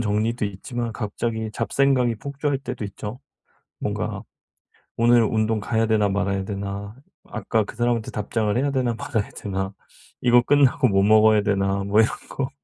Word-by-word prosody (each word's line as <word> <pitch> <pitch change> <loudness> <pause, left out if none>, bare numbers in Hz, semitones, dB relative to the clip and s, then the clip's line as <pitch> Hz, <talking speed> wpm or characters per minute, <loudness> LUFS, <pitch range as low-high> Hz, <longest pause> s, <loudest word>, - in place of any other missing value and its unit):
정리도 110 +1 0
있지만 115 +3 -5
갑자기 110 +1 -3
잡생각이 130 -1 +2
폭주할 140 +3 -2
때도 125 -4 -5
있죠. 105 +5 -7 0.6
뭔가 - - -3 0.8
'오늘 120 0 +5
운동 110 0 +1
가야 110 +2 0
되나 110 -2 +3
말아야 100 -1 -1
되나.', 100 +1 -5 0.3
'아까 110 -1 -1
그 - - -10
사람한테 120 -1 0
답장을 105 0 -1
해야 140 +2 +1
되나 125 -4 0
말아야 110 -2 -2
되나.', 95 -1 -3 0.5
'이거 120 0 +5
끝나고 140 0 +4
뭐 95 -3 +3
먹어야 110 0 +5
되나.' 100 -1 0
뭐 100 +2 +2
이런 110 - +3 0.2
거. 135 -1 -3
110 Hz, 330 characters per minute, -23 LUFS, 100-120 Hz, 0.8 s, 오늘